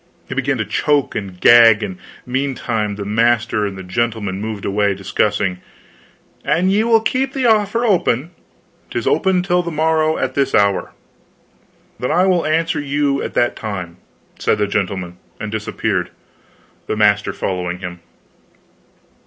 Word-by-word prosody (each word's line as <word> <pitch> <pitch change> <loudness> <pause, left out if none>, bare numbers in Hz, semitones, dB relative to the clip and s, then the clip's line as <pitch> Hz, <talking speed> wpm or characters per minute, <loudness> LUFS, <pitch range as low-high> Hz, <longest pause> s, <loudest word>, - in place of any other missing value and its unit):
He - - -5
began - - 0
to - - -2
choke 145 -2 +1
and 95 -4 -6
gag, 115 -1 +7
and 95 -3 -5 0.3
meantime 125 -5 -2
the 100 0 -6
master 110 0 +1
and 95 -1 -7
the 95 - -7
gentleman 105 0 -2
moved 110 -2 -5
away 100 0 +1
discussing. 95 -1 -1 0.8
"An 185 +3 +2
ye 210 +3 +3
will 225 -1 +4
keep 265 +3 -1
the 265 -2 -1
offer 220 +1 +2
open 170 - +1 0.3
" - - -37
"'Tis - - -3
open 190 -2 +2
till 180 -1 +2
the 170 - -4
morrow 160 0 +1
at 130 0 -2
this 135 -1 +1
hour." 100 -3 +2 1.1
"Then 125 - -2
I 175 +4 +3
will 180 -4 +2
answer 165 +1 +1
you 145 -1 0
at - - -5
that 120 - +2
time," 90 -5 -6 0.4
said - - +1
the 105 - +1
gentleman, 95 -3 -3 0.2
and 110 0 -5
disappeared, 105 -3 -2 0.8
the - - -2
master 105 -1 +3
following 90 -1 -3
him. 90 -1 -7
115 Hz, 155 wpm, -18 LUFS, 100-160 Hz, 1.1 s, gag